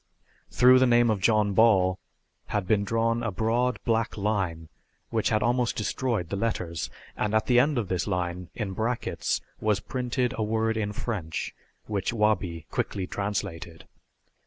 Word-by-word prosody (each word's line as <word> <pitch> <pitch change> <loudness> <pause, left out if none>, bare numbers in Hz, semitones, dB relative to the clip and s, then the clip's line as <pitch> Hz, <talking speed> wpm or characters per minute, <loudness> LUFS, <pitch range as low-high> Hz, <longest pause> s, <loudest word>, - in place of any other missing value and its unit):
Through 130 +1 +6
the 130 - +4
name 120 -1 +4
of 100 -3 -1
John 105 -1 +3
Ball 95 -4 +4 0.5
had 105 -3 -1
been 100 +1 +2
drawn 115 +2 +1
a 115 - -1
broad 115 +5 0
black 115 -1 0
line 95 -6 -1 0.4
which 110 -2 +1
had 110 -1 +1
almost 120 +1 +1
destroyed 110 -5 -1
the - - -2
letters, 90 -6 -2 0.3
and 105 0 -1
at 110 - +2
the 125 -1 +4
end 145 +2 +2
of 115 -5 -1
this 90 0 -1
line, 90 -2 -2
in 105 -4 -3
brackets, 115 +4 -1 0.2
was 105 -2 +1
printed 125 +1 -2
a - - +2
word 110 +1 0
in 105 -2 -1
French 100 -7 -4 0.3
which 100 0 -2
Wabi 95 -7 0
quickly 95 -2 -2
translated. 90 -4 -4
110 Hz, 160 wpm, -27 LUFS, 95-115 Hz, 0.5 s, Through